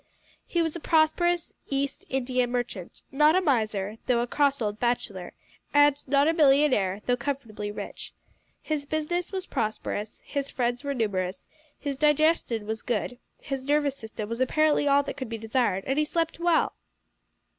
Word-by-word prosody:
He 340 -1 +1
was 325 -1 -2
a - - -4
prosperous 335 +2 +2 0.2
East 275 0 -2
India 255 -1 0
merchant 240 -7 -4
not 300 +4 +5
a - - +5
miser, 220 - 0
though 240 -2 +3
a - - 0
cross 280 +2 +1
old 210 -2 -2
bachelor, 220 -7 -2 0.4
and 290 -1 +6
not 280 +2 +4
a 325 - +3
millionaire, 270 - +3
though 245 - +2
comfortably 240 -6 -4
rich. 210 - -7 0.5
His 295 -2 -2
business 315 +4 -2
was 380 -1 -3
prosperous, 215 - -3
his 280 -1 -3
friends 245 +1 -1
were 280 -1 -2
numerous, 190 -5 -2 0.3
his 280 -2 -3
digestion 300 -6 +2
was 220 +1 -3
good, 245 +1 -2 0.2
his 270 -1 -5
nervous 290 -1 +2
system 220 -4 -7
was 230 +2 -4
apparently 295 +3 +3
all 280 0 +5
that 280 - -6
could 260 -4 -5
be 230 - -4
desired, 220 -3 0
and 270 +3 0
he 305 - +2
slept 330 +1 -1
well! 340 -1 +2
270 Hz, 165 wpm, -27 LUFS, 225-300 Hz, 0.5 s, and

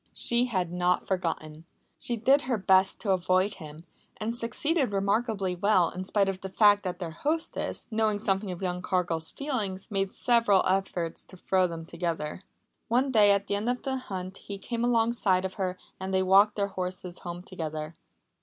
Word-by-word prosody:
She 240 +1 +3
had 185 -8 -1
not 180 0 +1
forgotten. 160 -4 -3 0.4
She 240 - -2
did 270 +6 +4
her 245 - +2
best 190 -1 +3
to 200 - 0
avoid 185 +2 +2
him, 155 0 -10 0.3
and 225 +2 -3
succeeded 265 +2 0
remarkably 200 -1 0
well, 185 -2 +3
in 185 - -5
spite 200 0 +2
of 190 -1 -3
the 190 - -5
fact 205 +1 +5
that 180 -3 -4
their 175 -3 -5
hostess, 310 - -2
knowing 215 -1 +1
something 200 -1 -1
of 180 +1 -6
young 180 -1 -2
Cargill's 175 -3 -1
feelings, 220 -9 -3
made 195 -1 0
several 230 -5 +3
efforts 185 -3 -1
to 185 - -14
throw 185 0 +2
them 165 -1 -7
together. 170 -1 -3 0.5
One 255 +4 +2
day 210 -4 +6
at 200 0 +3
the 200 - -2
end 205 +4 0
of 250 0 -2
the 265 -1 -1
hunt 190 -6 -6
he 200 - -7
came 235 +4 -4
alongside 225 -6 +2
of 190 - -4
her 185 -1 -1 0.2
and 190 0 -4
they 190 0 +2
walked 195 +3 +5
their 200 -1 0
horses 180 -1 -4
home 175 0 -7
together. 155 -3 -5
190 Hz, 180 wpm, -28 LUFS, 180-220 Hz, 0.5 s, day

